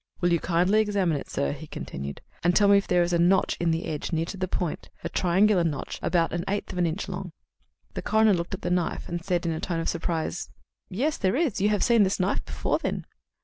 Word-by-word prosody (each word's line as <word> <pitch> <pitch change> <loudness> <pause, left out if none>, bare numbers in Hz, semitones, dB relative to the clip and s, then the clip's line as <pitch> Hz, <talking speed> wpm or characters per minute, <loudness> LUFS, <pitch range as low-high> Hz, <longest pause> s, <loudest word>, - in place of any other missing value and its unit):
"Will 175 -1 +2
you 170 - +3
kindly 180 +6 +3
examine 200 -6 +1
it, 140 - -5
sir," 70 - -1
he - - -8
continued, 70 +1 -6 0.2
"and 175 +1 +3
tell 205 - +5
me 200 0 +7
if 200 - -6
there 180 -1 +3
is 175 +1 -1
a 170 - +3
notch 185 +3 +3
in 170 - +1
the 165 +1 0
edge, 150 +2 -4
near 165 -1 0
to 185 - -6
the 185 -1 -2
point 175 -2 -3
a - - -2
triangular 185 +1 +3
notch 150 -5 -3
about 170 -2 +1
an 175 0 -1
eighth 205 +1 -2
of 180 - -4
an 175 - +3
inch 165 +5 -3
long?" 180 -2 -6 0.6
The - - -4
coroner 220 -1 +4
looked 175 +1 -2
at - - -14
the 175 - -1
knife, 180 -2 -1
and 175 - -3
then - - -17
said 175 -2 -1
in 165 - +1
a 160 - -3
tone 170 -1 -2
of 165 - -2
surprise: 165 0 -2 0.4
"Yes, 270 +11 -1
there 190 +3 +1
is. 275 - 0
You 205 - +3
have 210 -2 +1
seen 235 -3 +4
this 195 0 +2
knife 185 +2 0
before, - - -1
then?" - - -3
180 Hz, 255 wpm, -26 LUFS, 170-200 Hz, 0.6 s, me